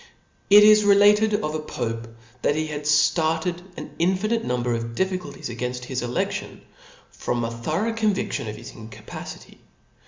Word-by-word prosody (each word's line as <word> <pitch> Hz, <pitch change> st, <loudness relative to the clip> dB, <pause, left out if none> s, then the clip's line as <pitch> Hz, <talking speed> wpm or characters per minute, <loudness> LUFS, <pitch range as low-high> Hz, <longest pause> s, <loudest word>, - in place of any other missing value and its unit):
^ -, -, -20 dB, 0.5 s
It 205 Hz, +1 st, +9 dB
is 215 Hz, 0 st, +7 dB
related 205 Hz, +1 st, +5 dB
of 150 Hz, 0 st, -2 dB
a 155 Hz, -, -2 dB
pope, 115 Hz, -6 st, -4 dB, 0.3 s
that 145 Hz, -, +1 dB
he 155 Hz, 0 st, -1 dB
had 150 Hz, -1 st, -4 dB, 0.2 s
darted 165 Hz, +2 st, -1 dB, 0.2 s
an -, -, -8 dB
infinite 195 Hz, +6 st, +1 dB
number 125 Hz, -1 st, -1 dB
of 115 Hz, 0 st, -4 dB
difficulties 185 Hz, -7 st, -3 dB
againft 125 Hz, +1 st, -4 dB
his 125 Hz, 0 st, -3 dB
eledlion, 120 Hz, 0 st, -3 dB, 0.5 s
from 120 Hz, -1 st, -2 dB
a 115 Hz, -, -2 dB
thorough 160 Hz, -, -2 dB
convidlion 210 Hz, -, -1 dB
of 105 Hz, -, -6 dB
his -, -, -10 dB
incapacity. 110 Hz, -1 st, -10 dB
155 Hz, 155 wpm, -24 LUFS, 120-200 Hz, 0.5 s, It